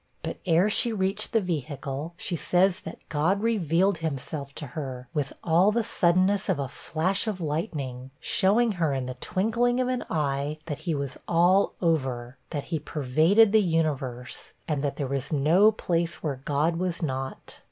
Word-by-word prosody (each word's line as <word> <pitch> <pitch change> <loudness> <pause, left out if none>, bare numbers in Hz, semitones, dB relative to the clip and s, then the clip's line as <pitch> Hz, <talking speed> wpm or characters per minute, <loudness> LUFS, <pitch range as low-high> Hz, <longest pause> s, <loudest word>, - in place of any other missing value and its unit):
But, - - -4
ere 170 +3 +4
she 230 +3 +1
reached 200 0 -1
the 225 - +3
vehicle, 150 -2 -4
she 180 - 0
says 180 +3 +2
that - - -8
God 170 +7 +1
revealed 190 -4 +2
himself 140 -2 -4
to 150 - -5
her, 130 -4 -5
with 145 -4 -1
all 175 +5 +4
the 230 +1 +1
suddenness 185 +1 +2
of - - +2
a 140 -1 -2
flash 175 - 0
of 205 -4 -2
lightning, 145 - -3
showing 220 +5 +3
her, 165 -7 0
'in 130 -1 -2
the 130 - -4
twinkling 225 - 0
of 255 0 +1
an 255 -1 -1
eye, 145 -1 -1
that 150 -3 -4
he 160 - +1
was 140 -2 -4
all 175 +4 +3
over' 130 -6 -1
that 145 -2 -3
he 160 - +1
pervaded 155 - +3
the 220 0 +5
universe 145 -8 -2
'and 150 -3 -1
that 140 -1 -1
there 140 - -2
was 135 +2 -3
no 165 +9 +5
place 170 -5 -2
where 140 -4 -3
God 150 +4 +1
was 175 -1 -2
not.' 130 -2 -4
165 Hz, 175 wpm, -26 LUFS, 140-190 Hz, -, the